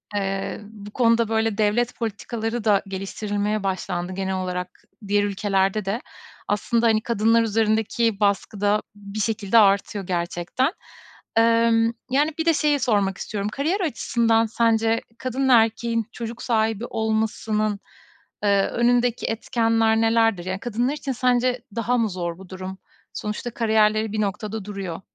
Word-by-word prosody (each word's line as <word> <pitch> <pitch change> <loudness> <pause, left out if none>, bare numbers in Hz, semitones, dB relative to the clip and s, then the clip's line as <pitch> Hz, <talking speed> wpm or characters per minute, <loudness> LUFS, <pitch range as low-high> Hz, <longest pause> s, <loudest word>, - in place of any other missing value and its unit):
eee, 195 0 -2
bu 210 -1 -11
konuda, 230 -1 +2
böyle, 220 -2 0
devlet 225 +3 +1
politikaları 225 +1 -3
da 205 -3 +3
geliştirilmeye 205 +2 -2
başlandı. 185 -1 -2
Genel 190 0 -2
olarak 180 -1 -4 0.2
diğer 205 +1 +2
ülkelerde 200 0 0
de 205 +6 -2 0.5
aslında, 230 +3 +1
hani, 220 -1 +3
kadınlar 230 0 +3
üzerindeki 220 0 +1
baskı 200 0 0
da 205 +1 +2
bir 205 +1 -8
şekilde 215 0 +1
artıyor 200 -1 +3
gerçekten. 175 - -1 0.7
Emm, 230 0 +4 0.2
yani, 290 +4 +3
bir 320 - 0
de 330 - +5
şeyi 295 -1 +2
sormak 205 -6 +1
istiyorum. 205 -1 -3
Kariyer 315 - -1
açısından 230 -8 +1
sence 225 0 +2 0.2
kadın 260 +2 -1
ve - - +7
erkeğin 230 0 +2
çocuk 230 0 -6
sahibi 225 -1 0
olmasının, 220 -2 -1 0.6
eee, 200 -1 +3
önündeki 245 0 +1
etkenler 225 0 +1
nelerdir? 225 -5 +2
Ya, 185 0 -3
kadınlar 240 +3 -1
için 295 -2 -4
sence 250 0 +1
daha 235 +2 +1
mı 225 -2 +1
zor 175 -2 -4
bu 190 -2 -13
durum? 185 0 -7 0.4
Sonuçta 210 +3 -4
kariyerleri 220 -1 +2
bir 215 - 0
noktada 210 +1 -3
duruyor. 195 -4 -5
220 Hz, 140 wpm, -23 LUFS, 200-230 Hz, 0.7 s, ve